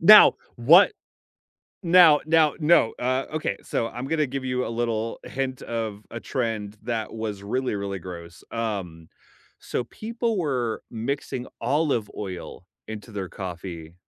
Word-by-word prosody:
Now, 210 +6 +10 0.2
what 165 - +7 0.9
now 170 -4 +7
now 155 -2 +4
no, 155 -7 +4
uh, 130 +2 0
okay, 150 -11 -1
so 115 - -1
I'm 125 +2 -6
gonna 155 -1 +1
give 135 0 -4
you 125 0 -1
a - - -3
little 115 -1 -2
hint 130 -1 -3
of 110 -3 -3
a 115 - -6
trend 110 -3 -3
that 115 -1 -3
was 110 -3 -4
really, 125 +3 -1
really 100 -1 -3
gross, 85 -1 -9
um, 95 -8 -4 0.5
so 125 - -3
people 230 - -3
were 125 -8 -1
mixing 125 +2 -3
olive 140 -8 +1
oil 95 -2 -7 0.2
into 110 +1 -8
their 95 -3 -4
coffee 85 -3 -7
115 Hz, 140 wpm, -25 LUFS, 100-140 Hz, 0.9 s, Now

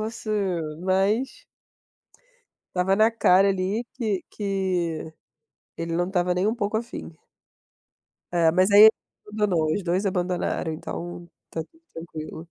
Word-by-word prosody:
você" 215 -5 -2 0.2
mas 195 +8 0 1.3
estava 185 +1 +2
na 215 +2 +5
cara 195 -3 +4
ali 195 +4 -1
que 215 -6 -2
que, 185 -6 -2 0.6
ele 165 0 -3
não 175 +1 0
estava 180 -1 +1
nem 180 +3 +1
um 220 - 0
pouco 210 -1 -1
afim. 235 -6 -6 1.2
É, 170 -2 +3
mas 185 +4 +3
aí 205 +1 +8
ele 220 - +11 0.4
abandonou, 195 -7 +1
os 205 - -2
2 180 +3 0
abandonaram 180 -3 -1
então, 175 +2 -7 0.2
está 160 - -4
tudo 325 - -26
tranquilo. 160 -1 -8
185 Hz, 130 wpm, -25 LUFS, 175-210 Hz, 1.3 s, ele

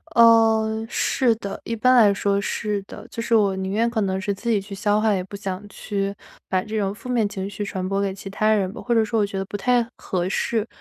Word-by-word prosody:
呃， 225 -1 +5
是 240 -2 +2
的， 200 -3 -6
一 230 - -3
般 255 +3 +4
来 220 -4 +7
说 200 0 0
是 205 0 -2
的。 210 - -11
就 230 - -5
是 230 0 +1
我 200 -3 +3
宁 190 0 -3
愿 225 +4 +2
可 230 -2 -1
能 190 -1 0
是 200 +1 -1
自 200 +5 -5
己 220 -3 +3
去 200 +1 -9
消 205 +1 +1
化， 215 -1 +2
也 185 -2 -1
不 195 - -9
想 195 0 -5
去 200 -1 -3 0.3
把 185 -1 0
这 220 +1 -4
种 195 -1 -1
负 210 - -11
面 235 -4 +2
情 190 -1 -4
绪 205 +1 -5
传 190 -2 -3
播 195 +1 0
给 195 -1 -1
其 195 +1 -10
他 215 +2 +1
人 195 -3 +1
吧。 - - -8
或 240 - 0
者 225 -1 +4
说 225 +1 0
我 210 - +3
觉 200 -1 -5
得 195 - -2
不 200 - -8
太 240 +3 +2
合 180 -1 -2
适， 220 +3 -1
205 Hz, 280 characters per minute, -23 LUFS, 195-225 Hz, 0.3 s, 来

